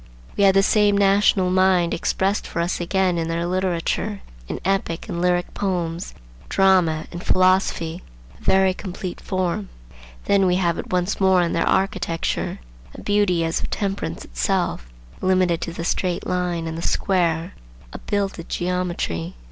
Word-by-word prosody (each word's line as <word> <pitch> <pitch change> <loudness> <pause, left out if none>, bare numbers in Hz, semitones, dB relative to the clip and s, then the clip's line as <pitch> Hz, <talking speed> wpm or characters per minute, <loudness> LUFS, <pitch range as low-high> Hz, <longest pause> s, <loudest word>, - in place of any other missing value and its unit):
We 200 - +3
have 195 0 +5
the 195 - +5
same 205 -1 +3
national 195 -2 +3
mind 185 -2 +3
expressed 195 +4 0
for - - -4
us 175 +1 -1
again 180 0 +1
in 165 - -2
their 165 +1 -1
literature, 185 +3 -1 0.3
in - - -4
epic 190 -3 -1
and 170 - -3
lyric 180 0 +1
poems, 175 -3 -3 0.3
drama, 180 -5 +3
and 175 0 -7
philosophy; 185 -2 +2 0.4
a - - -19
very 190 0 +4
complete 185 -1 -6
form. 180 - -2 0.6
Then 195 -1 +3
we 180 - +3
have 175 -3 +1
it - - -7
once 180 +2 0
more 190 -2 +4
in 170 - -1
their 170 - +1
architecture, 190 -4 -1 0.4
a - - -9
beauty 205 -5 +2
as 165 - -1
of - - -5
temperance 200 -1 -3
itself, - - -1 0.3
limited 185 -2 +2
to 170 - -3
the 170 0 -5
straight 180 -1 -1
line 180 -2 -1
and 160 0 -4
the - - -5
square,—a 165 - -2
builded 195 -4 -2
geometry. 175 - -2
180 Hz, 155 wpm, -22 LUFS, 170-190 Hz, 0.6 s, have